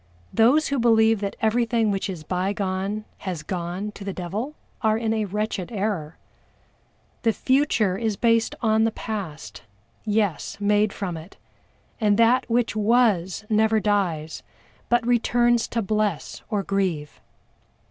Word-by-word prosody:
Those 265 +8 +4
who 280 -1 0
believe 225 -2 +4
that 200 -1 -3
everything 230 -1 +2
which 195 0 -2
is 175 -5 -6
bygone 195 +3 -2
has 180 -5 -5
gone 180 +5 -4
to 205 - -10
the 195 -1 -4
devil 210 - -4 0.3
are 220 -2 +2
in 225 -1 0
a 220 -1 0
wretched 210 -1 -3
error. 195 -7 -2 1.0
The 230 - +3
future 260 -7 +2
is 220 -3 -1
based 230 0 +2
on 220 0 +3
the 225 - +3
past 200 -9 -6 0.4
yes, 205 -4 -1
made 205 0 +2
from 185 -5 -4
it, 160 +4 -12 0.6
and 210 -3 +3
that 240 +3 +3
which 235 -1 +1
was 215 -4 +2
never 220 0 +3
dies, 180 -7 -1 0.5
but 240 -1 +2
returns 240 0 +2
to 230 -1 -2
bless 210 -5 -1
or 205 -2 -1
grieve. 185 -8 -2
210 Hz, 135 wpm, -24 LUFS, 190-225 Hz, 1.0 s, Those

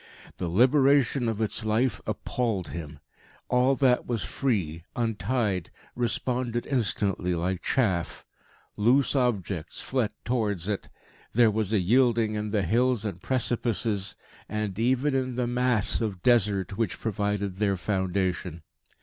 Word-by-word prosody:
The 90 - -2
liberation 130 - +4
of 110 -1 -3
its 110 +1 +1
life 110 +1 +1
appalled 110 -7 -2
him. 75 -3 -7 0.5
All 125 +2 +3
that 130 -2 +2
was 115 -3 -1
free, 95 - -1
untied, 110 -4 -1 0.3
responded 120 0 -1
instantly 100 -8 0
like 90 +2 -2
chaff; 95 - 0 0.5
loose 130 +7 +3
objects 100 - -1
fled 125 -5 -1
towards 105 -7 0
it; 105 -2 -3 0.4
there 115 -1 +5
was 105 -1 -1
a 110 - +3
yielding 115 +2 +3
in 105 0 -2
the 105 -2 0
hills 120 +1 +1
and 95 -4 -4
precipices; 115 -5 0 0.3
and 105 -2 -3
even 130 +4 +2
in 130 -2 -1
the 125 0 0
mass 120 -3 +1
of 100 -6 -3
Desert 105 -5 +2
which 115 -5 -1
provided 100 -3 -2
their 100 -2 +1
foundation. 90 -3 -2
110 Hz, 130 wpm, -27 LUFS, 95-125 Hz, 0.5 s, there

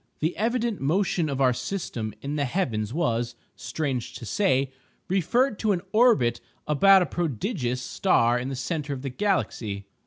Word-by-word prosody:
The 160 +3 0
evident 235 0 0
motion 165 +2 +1
of 140 -1 -3
our 130 -2 +4
system 125 - -4
in 140 +2 -3
the 145 -2 0
heavens 115 - -1
was 120 -6 -1 0.2
(strange 135 -6 -3
to 120 - -7
say!) 135 - +1 0.4
referred 205 - +1
to 215 -2 +2
an 175 - -2
orbit 220 - +4 0.3
about 190 +6 +6
a - - -1
prodigious 140 - -2
star 120 -7 +2
in 125 +2 -4
the 135 - -3
centre 145 +2 -3
of 130 -1 -7
the 135 - -2
galaxy. 125 - -1
145 Hz, 160 wpm, -26 LUFS, 125-195 Hz, 0.4 s, about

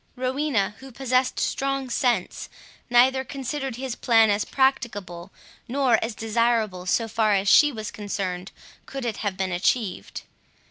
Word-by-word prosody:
Rowena, 255 -5 0
who 265 0 -11
possessed 255 0 0
strong 275 -1 -1
sense, 240 -5 -1 0.4
neither 260 +2 +4
considered 270 0 -4
his 260 0 -4
plan 225 -3 +4
as 205 +1 +1
practicable, 205 -10 -1 0.4
nor 255 -2 +2
as 225 -1 -4
desirable, 220 -4 0
so 225 +4 +1
far 215 -1 +1
as 195 +1 0
she 295 +8 +6
was 215 -4 -6
concerned, 190 -3 -4 0.4
could 270 -2 -5
it 225 -3 -2
have 200 -3 -3
been 190 0 -2
achieved. 180 - -1
230 Hz, 140 wpm, -24 LUFS, 205-265 Hz, 0.4 s, she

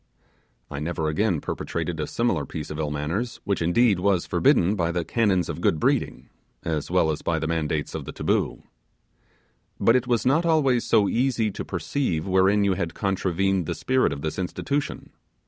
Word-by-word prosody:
I 70 - -4
never 80 0 -2
again 90 0 0
perpetrated 85 -2 -4
a 75 - -2
similar 120 +1 0
piece 75 -3 -6
of 75 - -5
ill 75 -2 -1
manners, 80 +12 -3
which, 100 -4 -1
indeed, 100 +4 +3
was 95 -2 +1
forbidden 95 +5 +3
by 85 -3 0
the 85 -1 -2
canons 95 -7 +1
of 80 - -5
good 80 - +2
breeding, - - 0 0.4
as 80 -3 -2
well 80 - +2
as 75 - -4
by 80 - 0
the 80 - -2
mandates 80 -2 -1
of - - -5
the - - -6
taboo. - - -1 1.2
But 115 - +4
it 125 0 +1
was 120 -2 +1
not 145 +6 +3
always 145 -8 +2
so 105 -3 +3
easy 120 -3 +1
to - - -5
perceive 90 - -2
wherein 95 +2 +3
you 100 -1 +2
had 85 -3 -3
contravened 95 -2 0
the - - -2
spirit 130 0 +1
of 70 - -5
this 80 +3 -3
institution. 140 +10 -3
95 Hz, 180 wpm, -25 LUFS, 80-115 Hz, 1.2 s, But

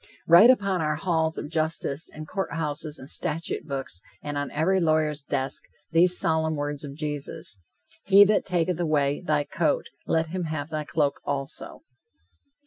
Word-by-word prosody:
Write 175 +8 +8
upon 200 -8 +3
our 155 -1 0
halls 160 -1 0
of - - -4
justice 160 -2 -1
and 155 0 -9
courthouses 155 -4 -3
and 130 - -11
statute 160 +3 -3
books, 135 - -5 0.2
and 145 0 -4
on 145 0 -2
every 185 +5 +1
lawyer's 155 -3 +1
desk, 135 -1 -2 0.3
these 175 +2 +5
solemn 160 -1 +2
words 145 0 -3
of 140 -1 -7
Jesus: 145 -9 -4 0.5
"He 200 +1 +8
that 205 +1 +3
taketh 180 -1 0
away 145 -4 +1
thy 150 -4 +1
coat, 155 +1 -1 0.2
let 160 0 +1
him 180 0 -3
have 155 -1 -4
thy 155 -1 -3
cloak 145 -2 0
also." 140 -1 -4
155 Hz, 155 wpm, -26 LUFS, 145-170 Hz, 0.5 s, Write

